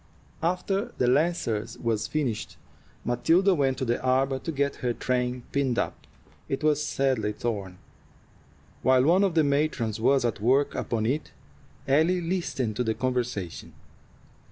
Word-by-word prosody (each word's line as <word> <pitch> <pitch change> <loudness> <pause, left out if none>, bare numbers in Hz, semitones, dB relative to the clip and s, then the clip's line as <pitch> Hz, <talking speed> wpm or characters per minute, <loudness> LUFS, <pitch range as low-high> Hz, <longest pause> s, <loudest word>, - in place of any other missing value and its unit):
After 195 +6 -1
the 125 - +2
Lancers 125 -6 0
was 115 -3 -1
finished, 135 -8 -2 0.5
Matilda 165 +11 +3
went 135 -5 +1
to 130 - -2
the 120 0 0
arbor 130 +1 +1
to 165 - -4
get 140 -1 -1
her 125 -1 -1
train 125 0 -1
pinned 135 -4 0
up. - - -3 0.4
It 135 - -2
was 150 -1 +2
sadly 130 -8 0
torn. 100 -5 -4 1.0
While 130 +1 +4
one 175 +7 +4
of 190 -4 +1
the 160 - +5
matrons 140 -7 0
was 135 +1 +3
at 115 -3 -2
work 135 +5 +3
upon 110 -2 -2
it, 140 +7 -1 0.6
Ellie 160 +7 +3
listened 165 - -2
to 125 - +1
the 110 -2 -1
conversation. 125 -8 -3
130 Hz, 145 wpm, -27 LUFS, 120-155 Hz, 1.0 s, the